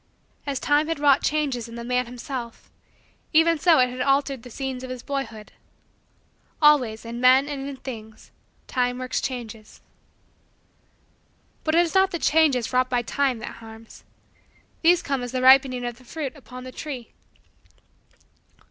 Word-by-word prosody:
As 275 -2 -2
time 295 +1 +2
had 330 - -2
wrought 285 -2 +4
changes 275 -6 -1
in 230 - -10
the 235 - -6
man 250 0 0
himself, 245 -1 -7 0.6
even 325 0 +4
so 335 0 +5
had 250 -1 +3
it 250 0 -5
altered 275 -1 +1
the 245 - -12
scenes 260 +1 -5
of 255 - -7
his 255 -1 -7
boyhood. 235 -7 -5 1.1
Always, 255 -8 +3
in 235 +1 -6
men 260 +2 +5
and 280 -1 -5
in 280 - -6
things, 220 -5 -10 0.3
time 245 -1 -1
works 255 0 -2
changes. 225 -4 -6 1.8
But 315 0 +1
it 340 - +6
is 330 - -6
not 380 0 +4
the 345 - -3
changes 295 -7 +2
wrought 255 0 +2
by 245 -1 0
time 265 +1 0
that - - -9
harms. 225 0 -13 0.8
These 345 +1 +4
come 275 -2 -2
as 245 0 -6
the 255 0 -1
ripening 260 -1 +5
of 240 0 -5
the - - -18
fruit 285 +1 -5
upon 255 -3 -11
the 255 - -8
tree. 260 -5 -7
255 Hz, 160 wpm, -24 LUFS, 245-285 Hz, 1.8 s, it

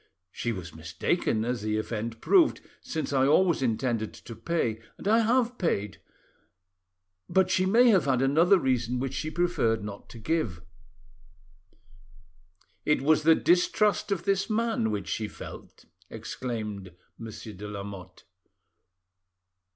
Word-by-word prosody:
She 120 - -3
was 90 -6 -7
mistaken, 90 - -1
as 120 -2 -2
the 105 0 -1
event 110 +1 -4
proved, 350 -5 +4 0.2
since 155 -3 -4
I 135 0 +3
always 170 +1 +3
intended 115 -2 -1
to 115 - -10
pay, 115 -2 -1 0.2
and - - -7
I 220 +2 +5
have 245 +2 +1
paid. 105 - -1 1.3
But 190 -1 +3
she 185 0 +2
may 240 +5 +5
have 190 -10 +4
had 130 -3 +2
another 165 +8 +5
reason 125 -5 0
which 135 +1 -3
she 155 - -3
preferred 155 - 0
not 105 -1 -8
to - - -11
give." 115 - -2 2.2
"It 150 -3 +1
was 155 +1 +4
the 160 +1 +6
distrust 200 +4 +2
of 195 -4 -1
this 195 0 0
man 225 - 0
which 100 -4 -3
she 110 +4 -2
felt," - - -11 0.2
exclaimed 105 -7 -6 0.2
Monsieur 110 -1 -8
de 105 +2 -8
Lamotte. 100 -3 -8
125 Hz, 135 wpm, -27 LUFS, 110-175 Hz, 2.2 s, the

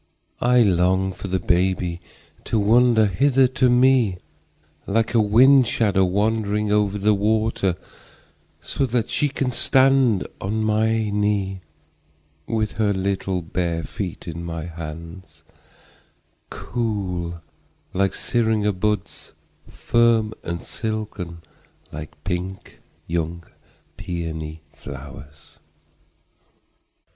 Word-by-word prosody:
I 125 0 +5
long 95 0 +2
for 100 - -7
the 95 0 0
baby 90 -1 0 0.4
to - - 0
wander 110 +1 +4
hither 135 +6 +3
to 130 0 +2
meLike 115 -2 0
a 115 - +4
wind 125 +5 +6
shadow 100 -4 +2
wandering 105 +2 0
over 105 -1 +2
the 105 +1 +3
water, 105 -2 +1 0.8
So 135 - -2
that 120 -1 -1
she 145 - +1
can 135 -2 -2
stand 130 -4 +3 0.2
on 110 +3 -1
my 110 +1 +2 1.6
kneeWith 110 -2 -1
her 105 -2 +2
little 95 -1 -2
bare 85 0 -2
feet 90 -1 -6
in 85 0 -5
my 80 -1 -5
hands, 85 +2 -9 1.1
Cool 95 -8 -3 0.5
like 95 +1 +1
syringa 110 -3 +1
buds, 105 0 -3 0.3
Firm 115 -2 +2
and 85 0 -4
silken 105 -7 -5 0.5
like 75 0 -9
pink 95 +1 -5 0.3
young 85 0 -3 0.5
peony 80 -2 -5
flowers. 75 +2 -11
100 Hz, 95 wpm, -22 LUFS, 90-110 Hz, 1.6 s, wind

